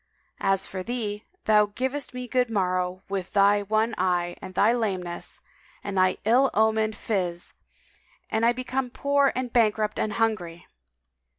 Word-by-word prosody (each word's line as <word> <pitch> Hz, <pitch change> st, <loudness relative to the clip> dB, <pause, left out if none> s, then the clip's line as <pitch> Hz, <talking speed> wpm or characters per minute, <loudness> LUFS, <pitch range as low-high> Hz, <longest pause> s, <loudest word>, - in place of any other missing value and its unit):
As 195 Hz, 0 st, +1 dB
for 190 Hz, -, -5 dB
thee, 215 Hz, -1 st, -4 dB, 0.2 s
thou 210 Hz, -1 st, +5 dB
givest 260 Hz, +6 st, -3 dB
me 250 Hz, 0 st, -6 dB
good 250 Hz, -1 st, +1 dB
morrow 185 Hz, -3 st, -1 dB
with 195 Hz, -2 st, -4 dB
thy 200 Hz, +1 st, +4 dB
one 215 Hz, +3 st, 0 dB
eye 175 Hz, -1 st, 0 dB
and 185 Hz, -1 st, -9 dB
thy 215 Hz, +5 st, +4 dB
lameness 185 Hz, -7 st, -3 dB, 0.4 s
and 200 Hz, -1 st, -4 dB
thy 185 Hz, 0 st, +3 dB
ill 250 Hz, +5 st, +4 dB
omened 220 Hz, 0 st, +2 dB
phiz 180 Hz, -6 st, -3 dB, 0.7 s
and 220 Hz, +1 st, -1 dB
I 235 Hz, -, +5 dB
become 255 Hz, +1 st, -3 dB
poor 280 Hz, +2 st, +2 dB
and 250 Hz, -1 st, -3 dB
bankrupt 215 Hz, -2 st, +2 dB
and 215 Hz, -, -1 dB
hungry!" 185 Hz, -7 st, -1 dB
215 Hz, 150 wpm, -26 LUFS, 185-240 Hz, 0.7 s, thou